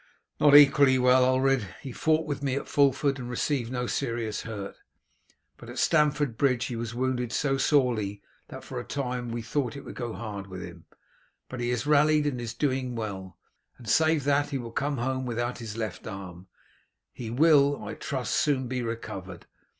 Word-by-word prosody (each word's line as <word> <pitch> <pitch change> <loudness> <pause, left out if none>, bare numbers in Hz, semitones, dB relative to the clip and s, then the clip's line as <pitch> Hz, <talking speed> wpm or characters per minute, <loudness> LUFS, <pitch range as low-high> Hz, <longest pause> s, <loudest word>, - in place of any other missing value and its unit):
"Not 145 -1 +6
equally 140 -2 +7
well, 125 0 +5
Ulred. 130 -6 +1
He 135 - -8
fought 160 +5 +1
with 145 -2 -4
me 135 -2 -1
at 140 - -4
Fulford 140 0 +2
and 120 -1 -6
received 125 -1 -1
no 125 -1 -2
serious 115 -3 -2
hurt, 105 -4 -6 0.8
but 115 - -12
at 120 - -8
Stamford 150 -6 +2
Bridge 130 -3 +2
he 125 - -4
was 115 0 -5
wounded 125 -1 -1
so 135 -2 0
sorely 120 -9 +1 0.3
that - - -9
for - - -6
a - - -5
time 125 -3 -3
we 115 0 -4
thought 125 0 -2
it 140 0 -9
would - - -8
go 120 -2 -5
hard 105 -3 -6
with 95 -2 -7
him; 85 -1 -11 0.6
but 130 - -6
he 120 0 -1
has 125 +3 -1
rallied 150 0 +4
and 130 -4 -1
is 115 -1 -5
doing 130 -2 -1
well, 95 -5 -6 0.4
and 120 - -13
save 160 +4 +3
that 145 +1 +2
he 140 - -2
will 120 -3 -7
come 140 +3 -1
home 130 +2 -1
without 120 +1 -2
his 115 -2 -7
left 110 -5 -5
arm, 95 -3 -8 0.7
he 115 -3 -6
will, 145 +2 +4
I 105 - -5
trust, 130 -4 -3
soon 135 -4 +1
be 125 0 -2
recovered. 95 -6 -6
125 Hz, 190 wpm, -27 LUFS, 115-140 Hz, 0.8 s, equally